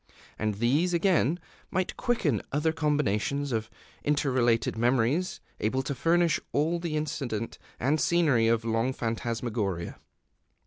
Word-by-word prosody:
And 110 -1 0
these, 145 - +2
again, 170 -3 +2 0.3
might 185 0 -1
quicken 175 - 0
other 150 +3 +1
combinations 145 -3 0
of 110 -1 -1 0.3
interrelated 130 -6 +2
memories 125 +9 +1 0.2
able 130 +5 0
to 140 - -2
furnish 165 +4 +2
all 160 +4 +1
the 165 -3 -2
incident 140 -8 -3 0.2
and 145 +6 +1
scenery 150 -10 +3
of 115 0 +3
the 115 - -3
long 115 +4 +1
phantasmagoria. 115 -6 -2
135 Hz, 125 wpm, -28 LUFS, 115-160 Hz, 0.3 s, scenery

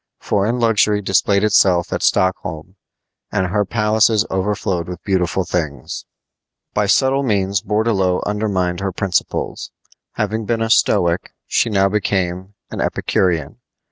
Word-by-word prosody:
Foreign 110 +5 0
luxury 110 -2 +3
displayed 100 0 +1
itself 95 -5 +3
at - - -2
Stockholm, 90 -1 0 0.6
and 95 - 0
her 105 +3 0
palaces 110 +1 +2
overflowed 95 -3 -1
with 90 -1 -8
beautiful 95 -1 0
things. 80 -4 -4 0.7
By 105 - +1
subtle 135 +6 +3
means 100 -6 0
Bourdelot 105 -4 0
undermined 100 -4 -1
her 95 0 -2
principles. 95 -1 -2 0.4
Having 110 0 -2
been 115 +1 0
a 115 - -1
Stoic, 85 -5 +2
she - - +1
now 100 -2 +3
became 95 -1 -2 0.2
an - - -4
Epicurean. 85 -4 -1
100 Hz, 125 wpm, -19 LUFS, 90-105 Hz, 0.7 s, luxury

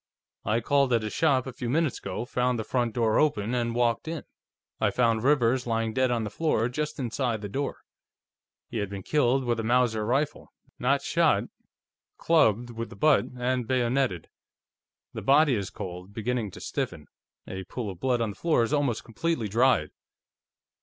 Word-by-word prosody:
I 110 +3 +1
called 140 +2 +2
at 115 -2 +2
his 110 - -4
shop 140 -6 +2
a 130 - -6
few 120 -1 -4
minutes 155 +2 +1
ago, 115 - -4
found 125 0 0
the 110 - -2
front 120 -1 -1
door 115 -3 +2
open, 120 -7 +1
and 120 -1 -1
walked 120 +3 +1
in. 160 -1 -4 0.6
I - - +3
found 115 -3 +2
Rivers 130 -3 +2
lying 115 -1 0
dead 130 +2 +2
on 120 -2 0
the 105 - -4
floor, 150 -8 +1
just 150 +4 -3
inside 120 -3 -2
the - - -3
door. 135 +8 -3 0.9
He 120 - -5
had 100 -2 -2
been 100 -1 -6
killed 135 -1 +2
with 120 -1 0
a - - -2
Mauser 120 -2 +2
rifle 135 +7 -1 0.3
not - - +1
shot; - - +2 0.7
clubbed 120 -8 +3
with 115 0 -5
the - - -11
butt, 155 -2 +4
and 125 -1 -1
bayoneted. 125 -7 0 0.9
The - - -5
body 145 +1 +4
is 100 -4 -2
cold, 90 +2 -8
beginning 115 -1 -1
to - - -11
stiffen; 75 - -4 0.4
a 95 0 -6
pool 110 0 -5
of 90 - -11
blood 125 +1 +1
on 110 -2 0
the - - -11
floor 160 -8 +2
is 115 - -2
almost 140 -6 0
completely 125 0 -2
dried." 115 -7 +2
120 Hz, 180 wpm, -27 LUFS, 110-135 Hz, 0.9 s, butt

